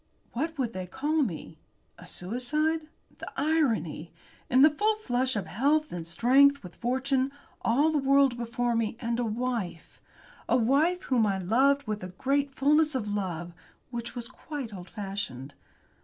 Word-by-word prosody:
What 315 +6 -2
would 245 -4 -1
they 185 -1 -5
call 295 - 0
me? 165 - -4 0.4
A 180 - -12
suicide? 300 - -1 0.3
The - - -7
irony! 240 - 0 0.4
In 260 +2 +6
the 305 - +8
full 425 +8 +1
flush 260 - -1
of 205 - -2
health 290 +8 +1
and 170 -2 -5
strength, 270 +10 +4
with 180 -1 -10
fortune, 260 +2 0 0.3
all 285 +7 +3
the 305 - +1
world 275 -2 +4
before 240 0 -1
me, 225 -1 -1
and 235 -1 -2
a - - +1
wife. 225 -6 -3 0.5
A - - +4
wife 290 +10 +2
whom 235 -5 +2
I 195 -1 0
loved 265 +9 +2
with 215 -3 -3
a - - -4
great 275 +10 0
fulness 300 +2 +3
of 210 -5 -2
love 175 -4 -3 0.4
which 235 0 -5
was 240 -1 -4
quite 260 -2 -7
old 180 -2 -9
fashioned. 195 - -5
245 Hz, 160 wpm, -28 LUFS, 205-280 Hz, 0.5 s, the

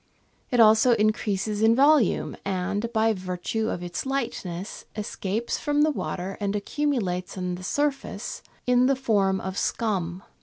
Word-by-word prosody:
It 245 - +1
also 220 +2 +6
increases 210 -1 0
in 225 +1 +5
volume, 280 -3 +3
and, 200 +4 -2
by 225 -1 +3
virtue 185 +4 -3
of 180 - -3
its 175 -1 -4
lightness, 230 -9 -4
escapes 210 +1 -3
from 295 0 +2
the 310 - +3
water 190 -8 -4
and 205 0 -1
accumulates 200 -7 -1
on 180 -1 -2
the 180 - -6
surface 285 +6 -2 0.2
in 250 0 +4
the 275 - +3
form 200 -7 +1
of 190 +1 -4
scum. 185 -5 -1
215 Hz, 145 wpm, -26 LUFS, 190-245 Hz, 0.2 s, also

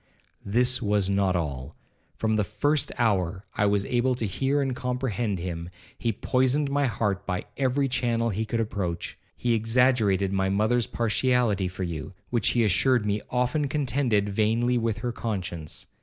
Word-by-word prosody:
This 125 +5 +2
was 100 -3 +1
not 100 -2 +2
all. 70 -4 -3 0.4
From 110 -1 0
the 105 - +2
first 140 +9 0
hour 100 -5 0
I 105 - +2
was 100 -1 +2
able 125 +2 +1
to 115 - -2
hear 135 +8 0
and 135 -3 0
comprehend 125 -5 -2
him, 85 -1 -5 0.3
he 115 - -1
poisoned 130 +6 +1
my 140 -1 +2
heart 105 -5 -1
by 90 -2 -2
every 135 +1 +1
channel 115 -2 0
he 105 +3 -1
could 115 +1 -2
approach. 95 -6 -3 0.2
He 120 -1 +1
exaggerated 110 -4 +2
my 95 0 +1
mother's 110 +4 +2
partiality 115 -3 +1
for 95 +1 -5
you, 85 0 -5 0.2
which 120 -3 +2
he 120 - +4
assured 110 +4 +3
me 105 0 0
often 125 +4 0
contended 130 -7 +1
vainly 115 +4 +1
with 115 -2 -1
her 120 - 0
conscience. 95 -9 -4
110 Hz, 160 wpm, -26 LUFS, 100-125 Hz, 0.4 s, he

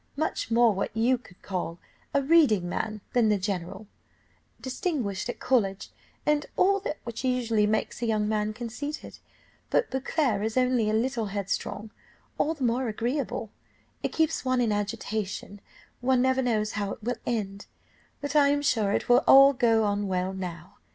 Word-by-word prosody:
Much 315 -5 -2
more 230 -1 +4
what 195 - -2
you 245 +3 +3
would 195 -7 -19
call 180 -3 -3 0.3
a 280 - +1
reading 270 - +4
man 215 +4 -3
than 235 -3 +3
the 210 - +3
general, 190 0 -4 0.7
distinguished 255 - -3
at - - -4
college, 200 -7 0 0.3
and 300 0 +1
all 395 +2 +4
that 310 -6 -4
which 235 +1 -6
usually 235 -5 +1
makes 220 +2 -1
a 235 - 0
young 215 -2 +1
man 215 0 0
conceited, 245 +7 -6 0.5
but 470 - +1
Beauclerc 265 -4 0
is 220 +2 -2
only 250 -4 +2
a - - 0
little 230 0 0
headstrong 200 +2 -3 0.5
all 320 +2 +1
the 285 - -5
more 245 +1 +1
agreeable, 235 0 -2 0.5
it - - -2
keeps 320 -5 0
one 255 -1 +1
in 235 -3 +2
agitation; 205 -1 -3 0.4
one 255 0 +2
never 260 0 +2
knows 215 -4 0
how 200 -1 -2
it - - -13
will 245 +1 -2
end, 200 -4 -3 0.5
but 285 0 -4
I 290 -1 +6
am 290 0 +1
sure 220 -8 +2
it - - -1
will 245 +3 +5
all 275 +1 +9
go 230 -3 +3
on 205 -1 0
well 185 0 -1
now. 175 -2 -7
230 Hz, 170 wpm, -27 LUFS, 205-260 Hz, 0.7 s, all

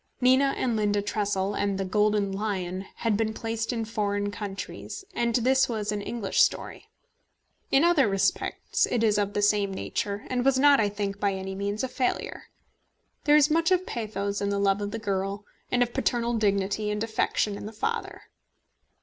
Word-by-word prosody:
Nina 260 +2 +4
and 240 -3 0
Linda 205 -1 +1
Tressel 205 -1 -1
and 200 -1 -1
The 195 - -2
Golden 210 +1 +1
Lion 195 -2 -3
had 225 -3 0
been 220 +1 -1
placed 225 +1 -3
in 230 -2 -2
foreign 205 -2 -1
countries, 205 - -6
and 235 -7 0
this 265 +2 +3
was 215 -3 -2
an 210 -1 -2
English 215 -1 0
story. - - 0 0.8
In 275 - +4
other 335 -8 +4
respects 195 -1 0
it 235 -2 0
is 210 -2 +3
of 205 0 -1
the 205 - +1
same 205 -1 +2
nature, 200 +2 -3
and 250 -1 -1
was 270 0 +3
not, 285 +1 +6
I 210 -2 +2
think, 200 -1 -4
by 200 -1 +1
any 190 0 -5
means 200 +3 -3
a - - 0
failure. 255 0 -2 0.8
There 295 0 +6
is 300 0 +5
much 330 +1 +3
of 370 0 +2
pathos 205 -3 -3
in 200 - 0
the 200 - 0
love 200 0 +2
of 205 - -2
the 225 - -4
girl, 200 -1 -3 0.3
and 245 0 +4
of 240 -1 -5
paternal 240 -3 0
dignity 205 -1 0
and 210 +1 -1
affection 220 -2 0
in 205 - -7
the - - -7
father. 450 - -3
210 Hz, 185 wpm, -27 LUFS, 200-240 Hz, 0.8 s, not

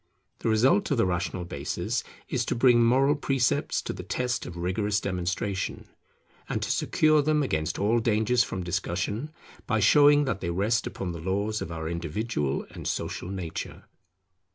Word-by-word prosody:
The - - -1
result 130 - +3
of 140 - +1
the 115 - +3
rational 90 0 -2
basis - - -3 0.2
is - - -1
to - - -1
bring 120 -1 +5
moral 135 +5 +4
precepts 135 -3 0
to - - -4
the - - -7
test 125 -1 -2
of 85 - -8
rigorous 100 +4 0
demonstration, 95 0 -3 0.6
and - - -1
to - - -1
secure 155 -1 +3
them 150 0 +2
against 80 - -1
all 110 +4 +2
danger 110 +1 +1
from 95 -6 +1
discussion, 95 - -2 0.4
by 110 -2 +1
showing 145 +6 +6
that 105 -7 -2
they 85 - -2
rest 105 +6 +1
upon 95 -2 -4
the 85 -1 -7
laws 100 +4 -1
of 85 - -5
our 80 -1 -4
individual 85 - -2
and - - -7
social 90 - -3
nature. 90 -4 -5
105 Hz, 165 wpm, -27 LUFS, 90-125 Hz, 0.6 s, showing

